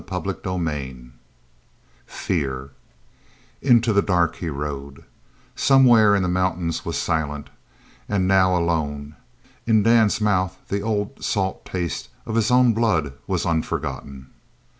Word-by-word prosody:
CHAPTER - - -2
XXXVI 75 -9 -5 1.0
FEAR 70 -5 -3 0.9
Into 120 -4 +4
the 100 - +4
dark 90 -4 +1
he 85 - -4
rode. 70 -1 -6 0.5
Somewhere 120 -6 +5
in 100 - +1
the - - 0
mountains 90 -2 -1
was - - -3
Silent, 75 -2 -2 0.6
and 95 -3 +1
now 95 -1 +4
alone. 75 -4 -2 0.5
In 110 -2 +4
Dan's 110 -2 +4
mouth 95 -3 0
the 100 +1 -1
old 105 -1 -3
salt 95 -2 -2
taste 90 -3 -4 0.2
of 110 - -5
his 110 -1 +2
own 125 -1 +5
blood 100 -11 0
was - - -1
unforgotten. 70 -4 -3
90 Hz, 120 wpm, -22 LUFS, 75-105 Hz, 1.0 s, Somewhere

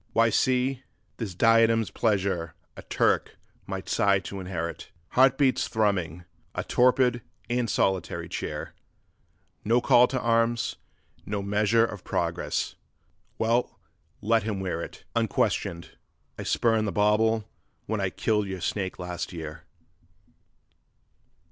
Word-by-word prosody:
'Why, 115 0 +4
see! 130 +2 +1 0.4
this 105 -7 -5
diadem's 115 +1 +4
pleasure 95 -7 0 0.2
a - - -9
Turk - - 0 0.3
might - - -5
sigh 100 -1 +3
to 100 +1 -7
inherit, 85 -3 -5 0.2
Heart 130 +1 +4
beats 135 -3 +2
thrumming; 90 -6 -1 0.3
a - - -2
torpid 125 -1 +3 0.3
and 120 -1 0
solitary 95 -3 0
cheer; - - -5 0.9
No 115 +3 +3
call 125 0 +5
to 130 - -2
arms, 115 0 +1 0.5
no 100 -1 -3
measure 105 +3 +3
of 105 -4 -7
progress! - - -2 0.6
Well, 115 +2 0 0.4
let 115 +2 +3
him 105 -2 -3
wear 90 -3 -2
it - - -9
Unquestioned... 95 -6 0 0.4
I - - -7
spurned 110 -2 +1
the - - -1
bauble 105 +2 +2 0.4
when - - -2
I - - +1
killed 105 -2 0
your 95 -2 -5
snake 95 +1 -2
last 90 0 -5
year. 80 -3 -8
110 Hz, 125 wpm, -27 LUFS, 95-115 Hz, 0.9 s, call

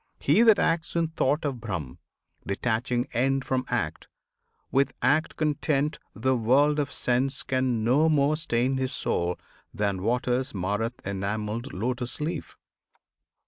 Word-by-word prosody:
"He - - +4
that 225 -3 +7
acts 165 0 0
in 165 -1 +1
thought 150 0 0
of 130 -5 -3
Brahm, 85 - -5 0.5
Detaching 120 +4 0
end 135 +2 +1
from 130 -1 -1
act, 120 -11 -2 0.6
with 135 +1 +2
act 150 +5 +2
content, 150 -1 0 0.2
The 130 +4 +1
world 140 +6 +3
of 145 -1 -1
sense 130 +2 0
can 130 -3 0
no 140 +8 +4
more 150 0 +3
stain 130 -4 0
his 130 -1 -1
soul 85 +1 0 0.3
Than 100 -3 -1
waters 125 +3 0
mar 100 +2 -1
th' 125 - -26
enamelled 105 +5 -3
lotus 120 +6 -3
leaf. 155 -1 -4
130 Hz, 140 wpm, -27 LUFS, 110-145 Hz, 0.6 s, that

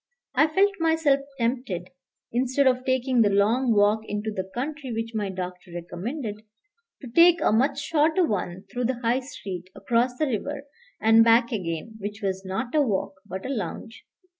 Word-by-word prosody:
I 285 +4 +4
felt 390 +6 +3
myself 320 -4 +3 0.2
tempted, 230 -7 -2 0.4
instead 260 +3 +1
of 255 -1 +3
taking 260 -1 +2
the 210 - +4
long 220 +6 +2
walk 210 0 +4
into 210 +1 -3
the 190 -2 -4
country 275 +2 -4
which 225 0 -3
my 210 -3 -2
doctor 180 -1 -6
recommended, 210 - -5 0.6
to - - -6
take 340 +7 +6
a - - +2
much 260 +6 +2
shorter 315 +4 +2
one 190 - -3
through 245 0 -2
the 250 0 -1
High 240 +2 +2
Street, 190 -9 -8
across 245 +1 0
the 310 - +1
river, 275 +3 -3 0.4
and 225 +1 +6
back 230 +1 +4
again, 185 +1 -4
which 205 +1 -5
was 190 -1 -2
not 225 +6 -4
a 305 - +4
walk 205 -7 -1
but 190 +1 -6
a - - -3
lounge. 225 0 -5
230 Hz, 170 wpm, -25 LUFS, 205-265 Hz, 0.6 s, take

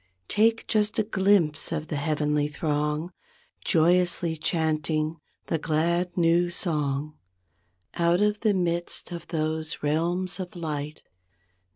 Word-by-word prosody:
Take 225 +2 +2
just 210 -1 +1
a - - +3
glimpse 190 -8 +2
of 155 -2 -3
the - - -2
heavenly 150 0 0
throng 150 +2 -2 0.5
Joyously 175 0 +3
chanting 155 -1 0 0.3
the 165 - -1
glad, 170 +4 0
new 170 +1 +3
song. 150 -4 -2 0.7
Out 170 +1 +2
of 210 0 +2
the 215 -3 +2
midst 175 -1 -2
of 170 -2 -7
those 155 -1 -3
realms 175 +5 0
of 185 -1 -6
light. 150 -3 -5
165 Hz, 115 wpm, -26 LUFS, 155-180 Hz, 0.7 s, a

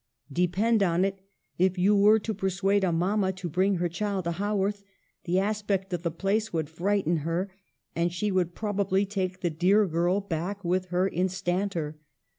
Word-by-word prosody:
" 145 - -16
Depend 205 +5 +2
on 180 -1 +3
it, 195 0 -3 0.4
if 185 +1 +2
you 195 +3 +4
were 205 +2 +6
to 220 +1 -3
persuade 195 0 +1
a 185 - +2
mama 190 +4 +1
to 185 -1 -6
bring 185 +4 +1
her 175 0 0
child 195 +2 -2
to 170 - -1
Haworth, 205 +2 -1 0.4
the 180 +1 +1
aspect 200 -1 -1
of 175 - -1
the 170 - -1
place 200 +6 -1
would 160 -2 -2
frighten 175 0 +1
her, 165 +5 -2 0.4
and 170 +1 +1
she 200 +4 -1
would 180 -2 0
probably 200 -2 0
take 185 -2 -3
the 175 - 0
dear 190 +7 +3
girl 175 +2 +1
back 195 +1 -4
with 185 +2 +1
her 180 +1 +1
instanter. 180 -3 -2
190 Hz, 180 wpm, -27 LUFS, 175-200 Hz, 0.4 s, were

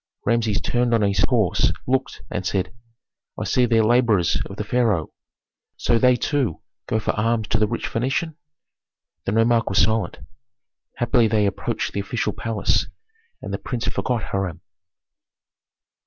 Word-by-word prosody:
Rameses 115 -4 +1
turned 120 +4 +1
on 110 - +2
his 100 -1 +2
horse, 110 -8 +2
looked, 130 +1 -1
and 95 - -2
said, 95 +2 -1 0.7
"I - - -2
see 125 -1 +2
there 115 -1 +3
laborers 110 -6 +3
of 100 - -9
the 105 - -3
pharaoh. 105 -7 0 0.6
So 115 - +2
they 125 0 +5
too 125 - -1 0.3
go 110 - +1
for - - 0
alms 110 0 0
to 110 - +2
the 105 - +3
rich 115 - -3
Phœnician?" 135 +7 -1 0.9
The - - 0
nomarch 115 +1 +3
was 95 - -1
silent. 110 0 0 0.8
Happily 120 -1 +3
they 105 -1 +2
approached 100 - -2
the - - -2
official 110 +4 -2
palace, 110 -4 0 0.6
and - - -5
the - - -2
prince 120 -3 -4
forgot 120 -4 -1
Hiram. 95 -4 -2
115 Hz, 150 wpm, -22 LUFS, 100-120 Hz, 0.9 s, they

